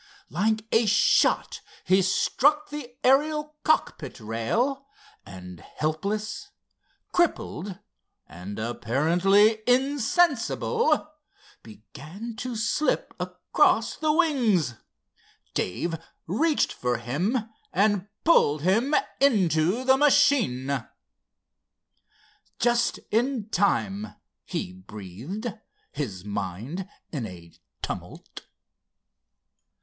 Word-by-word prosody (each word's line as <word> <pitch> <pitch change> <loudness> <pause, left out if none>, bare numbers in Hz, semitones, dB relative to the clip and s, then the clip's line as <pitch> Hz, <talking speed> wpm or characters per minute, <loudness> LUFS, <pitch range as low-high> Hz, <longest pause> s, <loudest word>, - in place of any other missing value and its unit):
Like 215 +3 0
a 225 0 +3
shot 210 +2 +3 0.2
he 190 +1 +4
struck 290 +11 +2
the 265 -5 -7
Ariel 300 +3 +2
cockpit 155 - 0
rail, 225 - -1 0.4
and, 90 -2 -10
helpless, 210 - -3 0.6
crippled, 205 - -1 0.5
and 90 +6 -9
apparently 170 - +2
insensible, 285 - +2 0.5
began 155 - -10
to 250 +1 -4
slip 225 +7 0
across - - +1
the 310 -1 +1
wings. 250 - +2 0.8
Dave 165 - -2 0.3
reached 295 - +1
for 125 -1 -1
him 145 - -1 0.3
and 205 0 +2 0.2
pulled 150 - +4
him 230 - +2 0.2
into 195 - +3
the 265 0 +4
machine. 235 - +3 1.7
"Just 240 0 +2
in 235 -1 0
time!" 105 - 0 0.3
he 90 - -4
breathed, 110 - -7 0.4
his 105 -11 -5
mind 105 - -5 0.2
in 130 -8 -3
a 85 -3 -12 0.3
tumult. - - -7
200 Hz, 80 wpm, -26 LUFS, -, 1.7 s, he